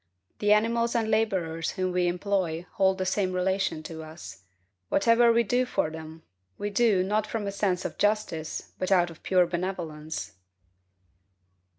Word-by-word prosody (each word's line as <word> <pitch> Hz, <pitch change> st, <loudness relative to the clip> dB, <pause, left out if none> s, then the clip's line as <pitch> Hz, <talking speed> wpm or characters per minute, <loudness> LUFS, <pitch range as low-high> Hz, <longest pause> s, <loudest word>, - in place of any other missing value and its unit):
The 210 Hz, 0 st, +2 dB
animals 230 Hz, +3 st, +2 dB
and 225 Hz, -1 st, +1 dB
laborers 185 Hz, -7 st, 0 dB
whom 185 Hz, -1 st, -1 dB
we 180 Hz, 0 st, +1 dB
employ 175 Hz, -2 st, -1 dB
hold 190 Hz, -3 st, +2 dB
the 185 Hz, -, -2 dB
same 190 Hz, 0 st, 0 dB
relation 185 Hz, -3 st, 0 dB
to 160 Hz, 0 st, -7 dB
us. 155 Hz, -, -10 dB, 0.5 s
Whatever 230 Hz, +3 st, +4 dB
we 235 Hz, 0 st, +4 dB
do 245 Hz, +3 st, +1 dB
for 200 Hz, -10 st, -1 dB
them, 160 Hz, 0 st, -9 dB, 0.3 s
we 205 Hz, 0 st, -3 dB
do, 205 Hz, -3 st, +3 dB
not 210 Hz, +2 st, 0 dB
from 220 Hz, -2 st, -3 dB
a 200 Hz, -, -2 dB
sense 195 Hz, -2 st, -1 dB
of -, -, -5 dB
justice, 205 Hz, -7 st, -1 dB
but 185 Hz, -, -2 dB
out 175 Hz, -2 st, +4 dB
of 165 Hz, -, -15 dB
pure 185 Hz, -1 st, +3 dB
benevolence. 165 Hz, -, -4 dB
190 Hz, 160 wpm, -27 LUFS, 170-210 Hz, 0.5 s, Whatever